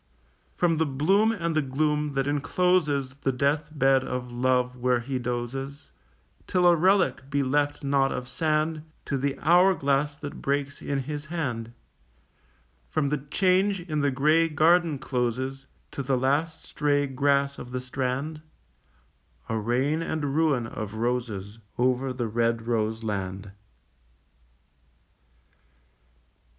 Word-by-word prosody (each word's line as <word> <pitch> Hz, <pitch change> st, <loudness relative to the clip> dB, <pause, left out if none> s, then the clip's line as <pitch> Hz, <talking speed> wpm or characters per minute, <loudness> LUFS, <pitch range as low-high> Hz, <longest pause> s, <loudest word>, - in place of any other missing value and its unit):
From 170 Hz, -2 st, +2 dB
the 160 Hz, -, +2 dB
bloom 190 Hz, +11 st, +3 dB
and 170 Hz, -7 st, -2 dB
the 155 Hz, -, +3 dB
gloom 150 Hz, +2 st, 0 dB
that 135 Hz, -1 st, 0 dB
encloses 145 Hz, -1 st, +1 dB
The 135 Hz, -, 0 dB
death 140 Hz, +4 st, 0 dB
bed 135 Hz, -3 st, +3 dB
of 125 Hz, -1 st, -4 dB
Love 125 Hz, 0 st, +1 dB
where 125 Hz, 0 st, +1 dB
he 130 Hz, +2 st, -3 dB
dozes 125 Hz, +4 st, -5 dB, 0.6 s
Till 180 Hz, -1 st, +2 dB
a 175 Hz, -1 st, +7 dB
relic 180 Hz, -5 st, +2 dB
be 140 Hz, 0 st, +1 dB
left 145 Hz, +2 st, 0 dB
not 140 Hz, -1 st, +2 dB
of 125 Hz, 0 st, -4 dB
sand 155 Hz, +1 st, 0 dB, 0.2 s
To 140 Hz, -, -2 dB
the 140 Hz, +1 st, -1 dB
hour 180 Hz, +4 st, +5 dB
glass 140 Hz, 0 st, 0 dB
that 145 Hz, -1 st, -8 dB
breaks 140 Hz, 0 st, -2 dB
in 140 Hz, -1 st, -2 dB
his 150 Hz, +2 st, -6 dB
hand; 125 Hz, -9 st, -3 dB, 1.2 s
From 140 Hz, -, 0 dB
the 150 Hz, 0 st, 0 dB
change 185 Hz, +7 st, +1 dB
in 155 Hz, -3 st, -3 dB
the 145 Hz, -, +2 dB
grey 155 Hz, +5 st, +3 dB
garden 165 Hz, 0 st, +3 dB
closes 130 Hz, +2 st, -2 dB, 0.2 s
To -, -, -4 dB
the 135 Hz, -1 st, 0 dB
last 150 Hz, +5 st, 0 dB
stray 145 Hz, -1 st, 0 dB
grass 140 Hz, +1 st, +1 dB
of 125 Hz, -, -8 dB
the 125 Hz, -, -2 dB
strand, 130 Hz, +4 st, -3 dB, 1.1 s
A 110 Hz, -, -1 dB
rain 130 Hz, +8 st, 0 dB
and 150 Hz, -4 st, -2 dB
ruin 150 Hz, -7 st, +2 dB
of 110 Hz, -1 st, -6 dB
roses 115 Hz, -3 st, -3 dB, 0.2 s
Over 130 Hz, +1 st, +1 dB
the 125 Hz, -2 st, -3 dB
red 115 Hz, +1 st, 0 dB
rose 110 Hz, -1 st, -1 dB
land. 100 Hz, -2 st, -4 dB
140 Hz, 135 wpm, -26 LUFS, 125-155 Hz, 1.2 s, a